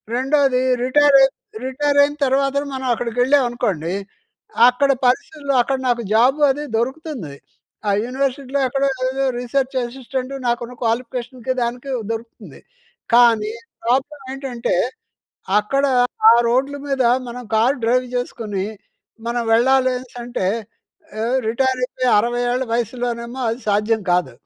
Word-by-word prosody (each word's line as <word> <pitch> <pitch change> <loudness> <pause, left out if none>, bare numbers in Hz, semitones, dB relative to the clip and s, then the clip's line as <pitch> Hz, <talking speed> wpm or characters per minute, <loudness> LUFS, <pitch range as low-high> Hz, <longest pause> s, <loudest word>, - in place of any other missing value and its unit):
రెండోది, 265 0 +2 0.2
రిటైరై, 275 +1 +5 0.4
రిటైరైన 285 +2 +2
తర్వాతన 275 +1 +1
మనం 265 0 -5
అక్కడికెళ్ళాం 245 +4 +2
అనుకోండి, 190 -9 -2 0.8
అక్కడ 275 +3 +2 0.2
పరిస్థితులు 280 +3 -1
అక్కడ 270 +2 -1
నాకు 240 -1 0
జాబ్ 250 +6 +4
అదీ 290 +2 -4
దొరుకుతుంది. 260 - -4 0.6
ఆ - - +3
యూనివర్సిటీలో 270 +1 -2
ఎక్కడో 275 +2 0 0.2
ఏదో 270 +1 -1
రిసర్చ్ 265 +2 -1
అసిస్టెంట్ 255 +1 -5
నాకున్న 240 0 -2
క్వాలిఫికేషన్‌కి 245 +2 -2
దానికి 245 +3 -3 0.2
దొరుకుతుంది. 230 0 -8 0.5
కానీ, 230 -3 +5 0.3
ప్రాబ్లమ్ 270 +4 -1
ఏంటంటే, 265 -3 -3 0.9
అక్కడ 275 +7 0 0.5
ఆ - - +8 0.2
రోడ్లు 270 +4 0
మీద 270 -2 +1 0.3
మనం 245 +1 -7
కార్ 235 +6 +3
డ్రైవ్ 250 +2 +2
చేసుకొని 215 -5 -3 0.6
మనం 240 0 -1
వెళ్ళాలి 260 +2 +4
అనేసంటే 245 -4 -5 0.7
ఏహ్, 235 +4 0
రిటైరైపోయి 255 +1 0
60 240 +3 0
ఏళ్ళ 250 +1 0
వయసులోనేమో 240 +1 -3
అది 225 +1 -2
సాధ్యం 210 +2 +1
కాదు. 175 -8 +1
250 Hz, 115 wpm, -20 LUFS, 235-270 Hz, 0.9 s, ఆ